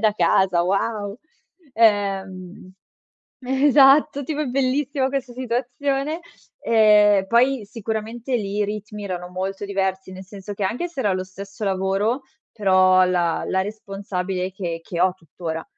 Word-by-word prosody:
da 215 -1 +3
casa? 180 -1 +2
Wow!" 205 +3 -1 0.6
Ehm 195 -4 0 0.7
Eh, 265 +2 0
esatto, 285 0 +5
tipo 300 +2 -3
è - - 0
bellissima 265 +1 0
questa 270 -2 -3
situazione. 265 +5 -2 0.4
Ehm, 210 -3 +5
poi 245 +2 +2
sicuramente 225 +3 -4
lì 205 -2 -4
i 210 - +1
ritmi 210 0 -6
erano 180 -2 -5
molto 190 +2 -4
diversi, 190 -1 -2
nel 190 +1 -9
senso 205 0 -8
che 200 - -6
anche 245 - -1
se 330 -6 -6
era 205 -6 +1
lo 185 0 -3
stesso 195 +3 -8
lavoro, 195 +6 0 0.3
però 185 -2 +4
la 175 -2 0
la 190 0 +1
responsabile 195 -3 -4
che 170 -3 -4
che 170 0 -5
ho 185 0 +3
tuttora, 165 -1 -6
205 Hz, 140 wpm, -22 LUFS, 190-245 Hz, 0.7 s, esatto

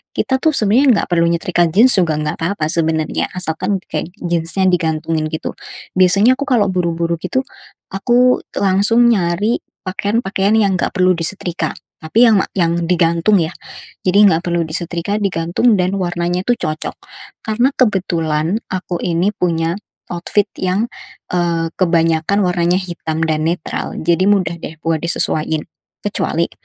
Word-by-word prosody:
kita, 265 -1 0
tuh, 310 +2 +1
sebenarnya 240 +4 +4
enggak - - -4
perlu 170 -1 +3
nyetrika 170 0 +1
jeans 215 +10 +4
juga, 165 -4 +1
enggak 150 0 -3
apa-apa 165 -2 -1
sebenarnya, 160 -2 0
asalkan 180 +2 -2 0.2
kayak - - -2 0.2
jeans-nya 175 +2 0
digantungin, 160 -2 -1
gitu. 160 0 -4 0.5
Biasanya, 200 +8 +5
aku 285 - -3
kalau 220 -8 +2
buru-buru, 170 -2 -1
gitu, 260 +10 -1 0.5
aku 245 +5 +3 0.2
langsung 200 +5 +3
nyari 200 +2 +1 0.2
pakaian-pakaian 200 +1 0
yang 200 -4 +2
enggak - - -2
perlu 185 -1 +3
disetrika, 170 -1 -2 0.2
tapi, 160 +10 +2
yang 225 -4 +5 0.2
yang 170 -2 0
digantung, 170 +3 +2
ya. 160 - -4 0.5
Jadi, 200 +2 +4
enggak 165 +2 -1
perlu 170 -1 0
disetrika, 170 +4 -2
digantung 190 +4 +1
dan 185 -1 +1
warnanya 175 0 -1
itu 245 - +3
cocok, 155 -8 -3 0.5
karena 240 +5 +1
kebetulan 175 -4 0
aku 185 -1 -3
ini 175 +1 +1
punya 165 -1 0 0.4
outfit 175 +4 0 0.2
yang, 190 +5 -1 0.4
eee, 170 -2 0
kebanyakan 165 +2 +2
warnanya 175 -1 +1
hitam 170 -3 -3
dan 155 -1 0
netral, 170 -1 -3
jadi 170 +3 +1
mudah, 180 -5 +1
deh, 160 - -8
buat 165 -1 0
disesuain, 160 -1 0 0.4
kecuali, 170 -4 -1
175 Hz, 140 wpm, -17 LUFS, 165-200 Hz, 0.5 s, Biasanya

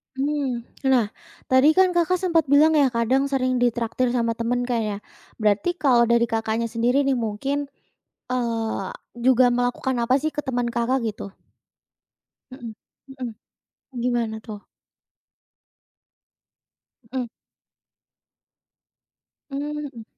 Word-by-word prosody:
Mhm, 270 -3 -1 0.2
nah, 240 -6 +3 0.4
tadi 275 +4 +5
kan 375 -1 +5
Kakak 345 +1 +2
sempat 335 -4 +1
bilang 290 +3 +5
ya, 295 -3 +4
kadang 255 +3 +1
sering 255 -2 0
ditraktir 240 +1 0
sama 230 -1 +1
teman 235 +2 -1
kan 245 -1 -1
ya. 210 -2 -2 0.4
Berarti 215 - +1
kalau 245 -7 +3
dari 235 0 +3
Kakaknya 225 0 -1
sendiri 240 +4 +2
nih 270 -2 +1
mungkin, 270 +6 -2 0.6
eee, 230 -5 -2 0.3
juga 250 +1 +4
melakukan 245 +1 -1
apa 235 +1 +1
sih 310 - 0
ke 295 -1 -5
teman 245 -3 -1
Kakak 240 +3 0
gitu? 200 -2 -8 1.2
Mhm, 240 -4 -8 0.5
mhm. 245 -2 -4 0.7
Gimana 235 -2 0
tuh? 210 -3 -9 2.5
Mhm. 255 -2 -2 2.2
Mmm, 275 - -4 0.3
mhm. 230 -2 -10
245 Hz, 115 wpm, -23 LUFS, 230-275 Hz, 2.5 s, tadi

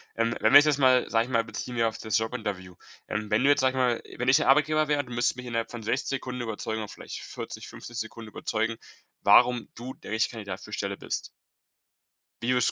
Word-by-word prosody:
Ähm, 115 +1 0
wenn - - +4
wir 145 - +12
das 145 -1 +2
mal 130 -2 +4
sage 115 0 +3
ich 130 - -9
mal, 115 -1 +2
beziehen 125 +2 -6
wir 115 0 +3
auf 110 - -4
das 110 -1 0
Jobinterview. 105 -6 -4 0.3
Ähm, 105 0 -3
wenn 105 - +3
du 140 - +5
jetzt, 145 - +4
sage 130 0 +3
ich 130 - -6 0.3
mal - - -13
wenn 125 - -1
ich 130 - +6
der - - +1
Arbeitgeber 155 +2 +4
wäre, 145 -1 +2
du 125 - -12
müsstest 120 +1 +1
mich 125 - -7
innerhalb 115 -1 -2
von 120 -2 -6
60 125 +5 -1
Sekunden 125 -2 -3
überzeugen 110 -1 -3
oder 105 - -6
vielleicht - - -8
40, - - -7
50 120 - -9
Sekunden 110 0 -6
überzeugen, 110 +2 -2 0.5
warum 125 -1 +5
du 125 +3 -7
der - - -11
richtige 110 +3 +1
Kandidat 100 -3 -6
für 105 - -12
die - - -4
Stelle 100 0 -3
bist? - - -4 1.2
Wie 120 - 0
würdest 125 -1 +3
du - - +2
115 Hz, 240 wpm, -27 LUFS, 110-130 Hz, 1.2 s, wir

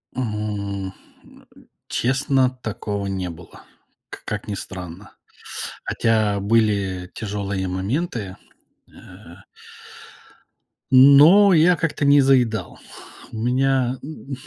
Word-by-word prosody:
М, 105 -5 -4 0.7
э, - - -18 0.3
честно, 135 +1 +1
такого 105 -5 -5
не 95 -2 -3
было, 85 +1 -13 0.5
к - - -11
как 105 0 -5
ни 105 - -4
странно. 90 0 -9 0.7
Хотя 110 -3 0
были 100 -4 0
тяжелые 100 -3 -4
моменты, 100 - -3 0.6
э. 90 -2 -15 1.6
Но 145 +10 +7
я 170 +2 +5
как-то 165 -3 -3
не 140 0 +6
заедал. 120 -8 +1 0.5
У 110 - -8
меня, 130 +2 0
м, 140 -2 -8
110 Hz, 95 wpm, -21 LUFS, 100-135 Hz, 1.6 s, Но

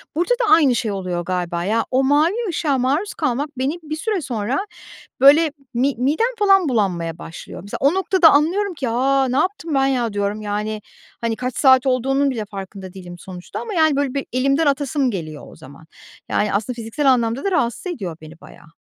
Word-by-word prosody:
Burada 350 +8 0
da 465 -4 +2
aynı 280 -7 +5
şey 220 -3 -1
oluyor 185 -3 -3
galiba, 175 -2 -2
ya, 225 +4 0
o 260 +1 +2
mavi 295 +6 +3 0.2
ışığa 300 -4 0
maruz 285 +11 0
kalmak 290 0 -1
beni 265 +4 0
bir 310 0 -4
süre 410 0 -2
sonra, 235 0 -2 0.6
böyle, 295 +3 +6 0.2
mi 260 +3 +1
midem 320 - 0
falan 390 -6 +4
bulanmaya 175 -8 -1
başlıyor. 165 0 -9
Mesela 200 - -6
o 280 +5 +4
noktada 375 -2 +4
anlıyorum 360 +7 +2
ki, 265 -6 -3
"A, 265 +3 +2
ne 255 +2 -1
yaptım 350 -4 -1
ben 270 0 +3
ya!" 245 -5 0
diyorum, 205 +1 -2
yani, 210 +1 -3 0.4
hani, 230 -1 -1
kaç 250 0 -4
saat 260 -1 +5
olduğunun 270 +2 +1
bile 220 -4 -4
farkında 195 -1 -9
değilim 180 -2 -10
sonuçta 180 -1 -8
ama, 445 -3 -6
yani, 315 -4 +3
böyle, 280 -2 -1
bir 275 - -3
elimden 275 +5 +2
atasım 280 -2 +1
geliyor 155 -6 -6
o - - -14
zaman. 140 +4 -14 0.4
Yani, 210 -1 0
aslında 220 +4 -1
fiziksel 240 +5 +1
anlamda 235 +1 0
da 395 - 0
rahatsız 275 - -1
ediyor 180 - -6
beni 155 +1 -13
bayağı. 165 -2 -16
260 Hz, 190 wpm, -20 LUFS, 205-300 Hz, 0.6 s, böyle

